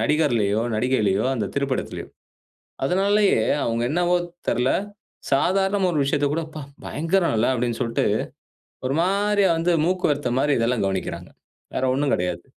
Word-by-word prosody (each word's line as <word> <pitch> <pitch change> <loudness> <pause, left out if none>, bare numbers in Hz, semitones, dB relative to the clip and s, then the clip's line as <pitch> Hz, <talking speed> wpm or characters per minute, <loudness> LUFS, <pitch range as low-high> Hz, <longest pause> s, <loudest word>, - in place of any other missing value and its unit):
நடிகர்லையோ, 115 -6 +1
நடிகைலையோ, 110 -4 +1
அந்த 110 -5 -2
திரைப்படத்திலையோ. 140 -2 -2 0.8
அதனாலேயே 200 +6 +3 0.2
அவங்க 115 0 -1
என்னவோ 175 +2 +2 0.3
தெர்ல, 125 +2 +1 0.6
சாதாரணமா 190 +6 +2
ஒரு 155 - 0
விஷயத்த 145 +1 +1
கூட, 165 - 0
"அப்பா! 155 -2 -8 0.2
பயங்கரல்ல." 165 - +1
அப்படீன்னு 120 -1 -1
சொல்லிட்டு 115 -2 0 0.8
ஒரு 135 - -1
மாரியா 200 +1 +2
வந்து 170 +2 +1
மூக்குவேர்த்த 150 -7 0
மாரி 145 +2 +2
இதெல்லாம் 115 -1 +1
கவனிக்கிறாங்க. 95 -1 -3 0.4
வேறு 130 - 0
ஒண்ணும் 140 0 0
கெடையாது. 90 -1 -2
140 Hz, 125 wpm, -23 LUFS, 115-180 Hz, 0.8 s, அதனாலேயே